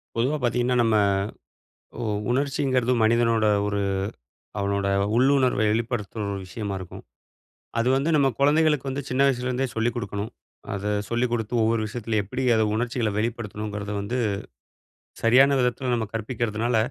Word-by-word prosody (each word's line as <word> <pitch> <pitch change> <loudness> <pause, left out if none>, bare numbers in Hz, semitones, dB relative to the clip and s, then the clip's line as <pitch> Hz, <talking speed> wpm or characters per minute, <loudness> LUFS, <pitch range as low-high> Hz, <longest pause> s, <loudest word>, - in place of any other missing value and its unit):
பொதுவா 130 +6 +1
பார்த்தீங்கன்னா 125 +1 +1
நம்ம 115 -1 +2 1.0
உ 115 - -2 0.2
உணர்ச்சிங்கிறது 130 -1 +1
மனிதனோட, 115 0 +3 0.2
ஒரு 100 0 -1 0.8
அவனோட 100 0 0 0.3
உள்ளுணர்வ 130 -2 +3
வெளிப்படுத்துற 115 -1 -2
ஒரு 100 - -4
விஷயமா 100 0 -4
இருக்கும். 95 - -9 0.8
அது 115 - +1
வந்து 140 +4 0
நம்ம 140 -2 +4
குழந்தைகளுக்கு 150 -1 +3
வந்து 140 +2 -3
சின்ன 130 +2 +1
வயசுலேருந்தே 130 0 0
சொல்லிக் 115 +1 0
கொடுக்கணும். 105 -2 -4 0.4
அத 100 0 -4 0.3
சொல்லிக் 120 +1 0
கொடுத்து, 115 -1 -2
ஒவ்வொரு 115 0 +2
விஷயத்தில 110 0 -2
எப்படி 125 +7 -4
அத 110 -1 +3
உணர்ச்சிகள 115 -1 -1
வெளிப்படுத்தணுங்கிறத 105 -2 -3
வந்து, 120 +6 -2 1.0
சரியான 135 +4 +5
விதத்துல 125 +1 0
நம்ம 110 -3 -2
கற்பிக்கறதுனால, 115 0 -1
120 Hz, 130 wpm, -25 LUFS, 110-130 Hz, 1.0 s, சரியான